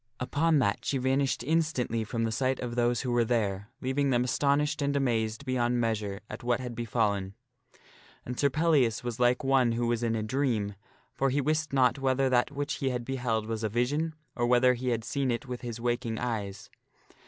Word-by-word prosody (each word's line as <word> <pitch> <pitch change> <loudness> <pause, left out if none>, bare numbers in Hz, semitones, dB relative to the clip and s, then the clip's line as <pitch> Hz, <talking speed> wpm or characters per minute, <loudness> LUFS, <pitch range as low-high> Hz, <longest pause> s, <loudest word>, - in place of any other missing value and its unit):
Upon 155 +5 +2
that 105 -7 +1
she 140 - 0
vanished 130 0 +1
instantly 140 -7 0
from 115 +2 -2
the 115 - 0
sight 130 +3 0
of 120 -1 -4
those 120 0 +1
who 125 - -2
were 120 0 +3
there, 105 -3 -1
leaving 135 +2 0
them 125 -2 +2
astonished 145 +3 +1
and 140 0 0
amazed 115 -2 0
beyond 125 -2 +1
measure 105 -4 -1
at 105 - -8
what 120 0 +1
had 125 -2 -5
befallen. 105 -4 -1 0.9
And 125 0 -5
Sir 140 - +4
Pellias 140 -7 +2
was 120 -1 -4
like 125 0 +3
one 135 -3 +3
who 120 +1 0
was 120 -1 0
in 115 -1 0
a 110 - -1
dream, 110 -4 0 0.4
for 135 - +1
he 135 +3 +1
wist 155 +2 0
not 130 0 +3
whether 135 0 +1
that 120 0 +3
which 145 +1 -3
he 135 - 0
had 125 -2 -3
beheld 120 -4 -1
was 110 0 -4
a 110 - 0
vision, 145 +8 0 0.2
or 120 -1 0
whether 125 +1 +5
he 125 +1 -3
had 115 -2 -1
seen 135 +2 -1
it 120 +1 -1
with 125 -2 -6
his 120 -2 -5
waking 120 -1 -1
eyes. 105 -5 -4
125 Hz, 200 wpm, -29 LUFS, 115-135 Hz, 0.9 s, whether